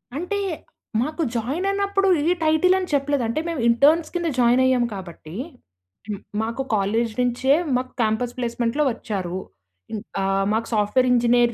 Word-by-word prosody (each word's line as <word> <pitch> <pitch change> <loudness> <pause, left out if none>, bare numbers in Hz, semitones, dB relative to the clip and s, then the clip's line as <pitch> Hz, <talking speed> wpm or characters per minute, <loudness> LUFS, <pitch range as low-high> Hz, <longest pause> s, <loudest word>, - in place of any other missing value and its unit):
అంటే, 360 +7 -2 0.6
మాకు 305 +6 -2
జాయిన్ 265 - -1
అయినప్పుడు 395 0 +1 0.2
ఈ - - +4
టైటిల్ 315 +4 +4
అని 370 - -4
చెప్పలేదు. 285 -1 +1
అంటే, 230 +7 -1
మేము 325 -7 -2
ఇంటర్న్స్ 295 +7 +4
కింద 345 -1 0
జాయిన్ 245 +1 +4
అయ్యాము 255 -2 +3
కాబట్టి, 170 -3 -9 0.7
హ్మ్, 205 -2 -4 0.2
మాకు 230 +4 -3
కాలేజ్ 215 +3 0
నుంచే 250 +2 +2 0.2
మాకు 255 0 -4
క్యాంపస్ 225 +2 0
ప్లేస్మెంట్‌లో 240 +3 0
వచ్చారు. 190 -6 -4 0.6
ఇన్ 215 - -3 0.2
ఆహ్, 195 0 +1
మాకు 225 +1 -1
సాఫ్ట్‌వేర్ 215 +5 +2
ఇంజినీర్ 240 0 +3
245 Hz, 145 wpm, -23 LUFS, 225-300 Hz, 0.7 s, ఈ